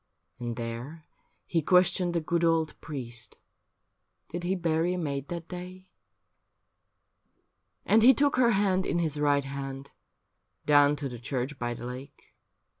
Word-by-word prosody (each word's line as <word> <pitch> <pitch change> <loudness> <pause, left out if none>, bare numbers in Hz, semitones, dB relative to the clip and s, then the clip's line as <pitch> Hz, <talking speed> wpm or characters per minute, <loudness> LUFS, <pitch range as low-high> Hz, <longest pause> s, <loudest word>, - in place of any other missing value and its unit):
And 120 -1 -4
there 120 +7 -6 0.4
he 165 - 0
questioned 180 +1 +3
the 170 - +1
good 170 +2 0
old 165 -2 +2
priest, 120 -6 -6 0.9
Did 175 - -4
he 185 +2 0
bury 170 0 0
a - - -3
maid 140 -5 -3
that 170 -1 -6
day. 185 +1 -9 1.9
And 225 - +5
he 245 +4 +9
took 285 0 +3
her 245 -2 +5
hand 195 -3 +2
in - - 0
his 155 -4 -1
right 145 -1 +2
hand, 135 0 -6 0.7
Down 145 0 +5
to 145 -1 -4
the 120 -3 -8
church 130 +3 -3
by 120 0 -2
the 120 - -8
lake. 125 +3 -9
155 Hz, 145 wpm, -28 LUFS, 135-175 Hz, 1.9 s, he